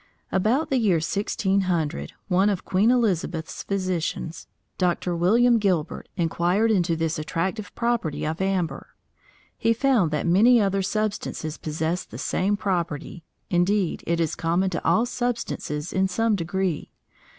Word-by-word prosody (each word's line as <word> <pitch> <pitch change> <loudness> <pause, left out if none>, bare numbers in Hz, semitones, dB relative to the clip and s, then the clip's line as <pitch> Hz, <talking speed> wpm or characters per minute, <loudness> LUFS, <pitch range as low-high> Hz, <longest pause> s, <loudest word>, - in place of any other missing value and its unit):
About 230 +12 +1
the 265 - +3
year 205 -6 +3
1600, 180 - -1
one 190 +1 +3
of 195 -3 -2
Queen 195 +5 +3
Elizabeth's 185 -9 0
physicians, 185 -4 -3 0.3
Dr. 180 -1 0
William 230 +7 +4
Gilbert, 185 -7 -1
inquired 175 +6 +1
into 175 -5 +2
this 160 -1 -1
attractive 185 +7 -3
property 235 -13 -1
of 160 +4 -3
amber. 190 -3 -2 0.6
He 230 - +3
found 235 - +2
that 150 0 -2
many 220 +8 +5
other 195 -2 +1
substances 200 -6 -2
possessed 160 +3 -2
the - - -8
same 200 +2 0
property. 170 -4 -3 0.3
Indeed 180 +1 +1
it 170 0 +1
is 165 -3 0
common 175 +3 0
to 170 - -3
all 180 +8 +3
substances 235 -11 -3
in 190 0 +2
some 225 +4 +1
degree. 180 -2 -2
185 Hz, 135 wpm, -24 LUFS, 165-210 Hz, 0.6 s, many